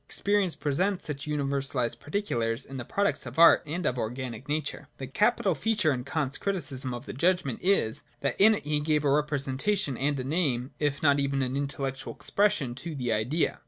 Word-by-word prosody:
Experience 200 -4 +1
presents 180 +7 0
such 150 0 -5
univer 140 -2 -1
salised 125 -4 -1
particulars 125 - -1
in 135 - -8
the 125 - -4
products 200 +10 -1
of - - -9
Art 170 0 +8
and 170 +3 -3
of 125 -3 0
organic 125 +3 -5
nature. 150 -1 -3
The 135 - -5
capital 205 - +2
feature 185 -1 +1
in 125 -1 -4
Kant's 150 -3 -2
Criticism 140 -10 -2
of 120 +2 -6
the - - -6
Judg 175 +6 +2
ment 130 -5 -3
is, 180 - +2 0.2
that 140 +5 -1
in 220 +2 +7
it - - -6
he 150 0 +1
gave 150 0 +1
a 140 - +3
representation 145 +3 0
and 140 +1 0
a - - -2
name, 135 -4 0
if 145 -1 -1
not 145 -1 +4
even 140 -1 0
an 130 +1 -2
intellectual 140 -1 -3
expression, 165 -11 +1
to 160 +5 -7
the 125 -4 -1
Idea. 120 +10 0
145 Hz, 200 wpm, -28 LUFS, 130-170 Hz, 0.2 s, Art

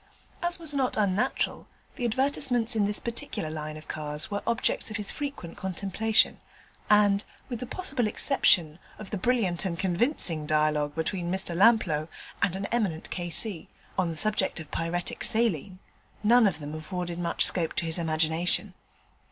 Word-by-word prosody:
As 345 0 0
was 325 -4 -1
not 265 -3 0
unnatural, 210 +5 0 0.3
the 245 - -3
advertisements 245 -1 +2
in 210 -2 +2
this 205 +1 +3
particular 230 -9 -4
line 155 0 -6
of 155 - -13
cars 150 +3 -2
were 205 - -2
objects 230 -1 0
of 215 - -4
his 210 -2 -1
frequent 280 - -6
contemplation, 200 +4 0 0.5
and, 205 -1 +4 0.3
with 240 -3 -4
the 250 - -6
possible 275 - +1
exception 175 - +3 0.2
of 215 - -10
the 210 - -2
brilliant 195 -6 0
and 175 -4 -3
convincing 180 - -1
dialogue 150 -1 +1
between 175 +2 -2
Mr 190 -2 0
Lamplough 180 -7 +3 0.3
and 190 -2 +1
an 195 +1 -4
eminent 195 -9 -2
K.C. 175 +1 -1 0.3
on 185 -3 0
the 165 - -4
subject 210 -2 +3
of 155 -2 -10
Pyretic 170 +1 -3
Saline, 200 -5 +2 0.5
none 230 +1 +5
of 180 -6 -1
them 150 -1 -7
afforded 175 +2 -5
much 170 -1 +2
scope 170 -3 +3
to - - -1
his 165 +1 +2
imagination. 160 +1 +1
190 Hz, 160 wpm, -27 LUFS, 165-225 Hz, 0.5 s, none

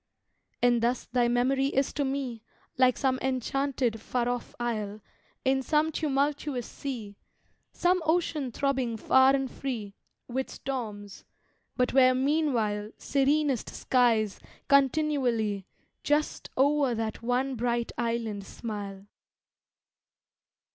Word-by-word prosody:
And 240 -1 +4
thus 240 +2 0
thy 245 -1 +1
memory 260 +3 +2
is 275 -1 0
to 290 - 0
me 265 -4 -3 0.3
Like 255 -1 +4
some 260 -1 +1
enchanted 260 -2 -1
far 240 0 -1
off 245 -1 -3
isle 215 -3 -2 0.5
In 265 0 +3
some 305 +4 +2
tumultuous 285 -3 -1
sea 225 -8 -6 0.5
Some 360 +1 +2
ocean 315 -5 0
throbbing 260 -3 -1
far 265 +4 +5
and 270 -2 -2
free 225 -7 -4 0.3
With 260 +2 -2
storms 210 -7 -6 0.5
but 250 0 +1
where 255 -1 +6
meanwhile 255 -7 +1
Serenest 280 -2 +1
skies 225 -5 +2 0.3
continually 265 - +2 0.4
Just 295 +1 0
o'er 280 -2 +3
that 225 -1 -3
one 250 +3 0
bright 235 -1 -1
island 230 -4 -2
smile. 200 -2 -6
255 Hz, 110 wpm, -28 LUFS, 230-275 Hz, 0.5 s, where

